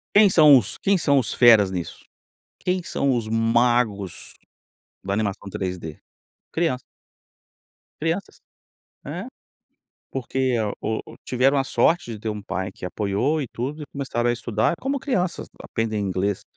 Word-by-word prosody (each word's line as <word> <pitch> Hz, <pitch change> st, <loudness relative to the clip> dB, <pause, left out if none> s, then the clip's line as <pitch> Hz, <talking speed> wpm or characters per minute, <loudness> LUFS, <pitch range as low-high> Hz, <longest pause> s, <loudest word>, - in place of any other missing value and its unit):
Quem 205 Hz, -1 st, +8 dB
são 155 Hz, -5 st, +8 dB
os 105 Hz, -, -4 dB
quem 200 Hz, -, +2 dB
são 145 Hz, -6 st, +3 dB
os 125 Hz, -5 st, +1 dB
feras 110 Hz, -6 st, +6 dB
nisso? 90 Hz, -3 st, -6 dB, 0.5 s
Quem 180 Hz, 0 st, -1 dB
são 140 Hz, -5 st, 0 dB
os 115 Hz, -2 st, -2 dB
magos 115 Hz, -3 st, +1 dB, 0.7 s
da 100 Hz, +1 st, -2 dB
animação 100 Hz, -1 st, -2 dB
3D? 90 Hz, -5 st, -5 dB, 0.5 s
Crianças 160 Hz, -7 st, 0 dB, 1.2 s
crianças, 165 Hz, +5 st, -2 dB, 0.7 s
é, -, -, -5 dB, 0.9 s
porque 130 Hz, -1 st, -1 dB, 0.2 s
o 110 Hz, +1 st, -2 dB
o 115 Hz, -, -13 dB
tiveram 135 Hz, +3 st, +2 dB
a 135 Hz, -, +1 dB
sorte 160 Hz, -2 st, +1 dB
de 110 Hz, -, -7 dB
ter 110 Hz, -, -5 dB
um 105 Hz, -1 st, -4 dB
pai 95 Hz, -1 st, -3 dB
que -, -, -11 dB
apoiou 105 Hz, -, 0 dB
e -, -, -4 dB
tudo, 140 Hz, +8 st, -5 dB
e -, -, -7 dB
começaram 120 Hz, -4 st, -1 dB
a -, -, +2 dB
estudar, 115 Hz, +1 st, 0 dB
como 275 Hz, +1 st, -1 dB
crianças 190 Hz, -10 st, -1 dB, 0.2 s
aprendem 110 Hz, -2 st, -2 dB
inglês 95 Hz, 0 st, -1 dB
120 Hz, 145 wpm, -23 LUFS, 105-145 Hz, 1.2 s, Quem